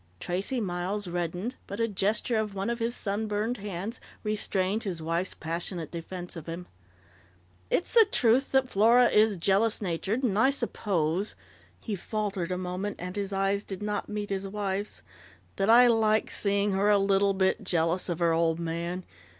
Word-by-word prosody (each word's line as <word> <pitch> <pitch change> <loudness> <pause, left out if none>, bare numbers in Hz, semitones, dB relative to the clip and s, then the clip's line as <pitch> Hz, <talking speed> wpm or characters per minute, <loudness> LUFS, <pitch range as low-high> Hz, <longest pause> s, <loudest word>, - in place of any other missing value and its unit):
Tracey 195 +9 -2
Miles 190 0 -2
reddened, 175 +6 -3
but 200 - -6
a 230 - +2
gesture 210 +3 0
of 215 -2 -2
one 195 +4 -1
of 235 - -3
his 230 +1 -1
sunburned 215 +3 -1
hands 200 +3 -5 0.2
restrained 210 -1 0
his 185 -6 -3
wife's 165 +3 -2
passionate 165 0 -4
defense 175 +1 -6
of 165 -1 -8
him. 170 +2 -5 1.0
"It's 350 - 0
the 455 -4 +7
truth 245 +3 +3
that 265 -1 +3
Flora 235 +3 +5
is 210 -1 +4
jealous 200 +6 +2
natured. 200 +6 -2
And 210 -5 +1
I 260 - +5
suppose 195 - -1 0.2
" - - -29
he 215 - -3
faltered 195 -2 -3
a 180 - -1
moment, 185 +3 -3
and 180 +2 -6
his 200 -1 -2
eyes 195 +1 0
did 195 0 -6
not 210 -1 -2
meet 210 -1 -4
his 195 0 -2
wife's, 200 0 -3 0.3
" - - -28
that 195 +2 +1
I 240 +2 +8
liked 220 -2 +3
seeing 200 0 +1
her 195 +2 +2
a 205 - +6
little 195 0 +3
bit 190 +2 +1
jealous 175 -1 0
of 170 - -1
her 170 -1 +2
old 165 0 +2
man. 170 +2 -3
200 Hz, 175 wpm, -28 LUFS, 180-215 Hz, 1.0 s, I